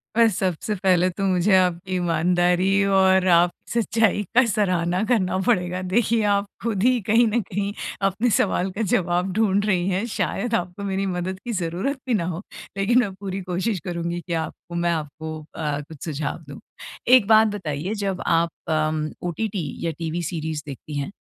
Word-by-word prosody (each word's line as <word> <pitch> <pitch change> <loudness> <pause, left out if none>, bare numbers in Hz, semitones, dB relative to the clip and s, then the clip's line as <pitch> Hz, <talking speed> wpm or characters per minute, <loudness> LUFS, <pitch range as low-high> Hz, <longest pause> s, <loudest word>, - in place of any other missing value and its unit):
अ, 230 0 +6
सबसे 190 0 -1
पहले 185 -2 +3
तो 195 +2 -5
मुझे 190 +1 +3
आपकी 185 +1 0
ईमानदारी 180 +3 +2
और 190 -1 +4
आप 170 +1 +5 0.2
सच्चाई 225 -2 +2
का 250 - +6
सराहना 185 -4 +1
करना 185 -5 +2
पड़ेगा। 180 -5 +1
देखिए 220 +4 +1
आप 200 0 +2 0.2
खुद 215 -4 -1
ही 250 0 +4
कहीं 225 +4 +3
न 225 +2 +1
कहीं 200 +1 -3 0.4
अपने 210 +6 0
सवाल 190 -1 0
का 205 +5 -4
जवाब 180 +1 +1
ढूँढ 205 -1 +2
रही 185 -3 +1
हैं 195 +4 0
शायद 235 -2 -1
आपको 180 +3 -3
मेरी 195 0 -1
मदद 185 0 -3
की 240 - -3
ज़रूरत 185 - -2
भी 250 - +1
ना 180 -6 +1
हो। 170 - -5 0.4
लेकिन 230 +6 +3
मैं 205 -5 0
पूरी 195 0 -5
कोशिश 185 +2 -2
करूँगी 170 -1 -3
कि 170 - -5
आपको 170 +2 -10
मैं 170 0 +1
आपको 155 0 -4 0.2
अ, 150 -2 -2
कुछ 150 0 -12
सुझाव 155 +1 -3
दूँ। 140 - -9 0.5
एक 245 -4 +6
बात 220 0 +6
बताइए 170 +1 -3
जब 195 -2 -2
आप 170 0 +2 0.2
उम, 155 -1 0 0.2
ओटीटी 190 -3 -3 0.2
या 165 - 0
टीवी 165 +1 -3
सीरीज 160 -2 -3
देखती 145 +1 -7
है 140 - -2
185 Hz, 175 wpm, -23 LUFS, 170-205 Hz, 0.5 s, अ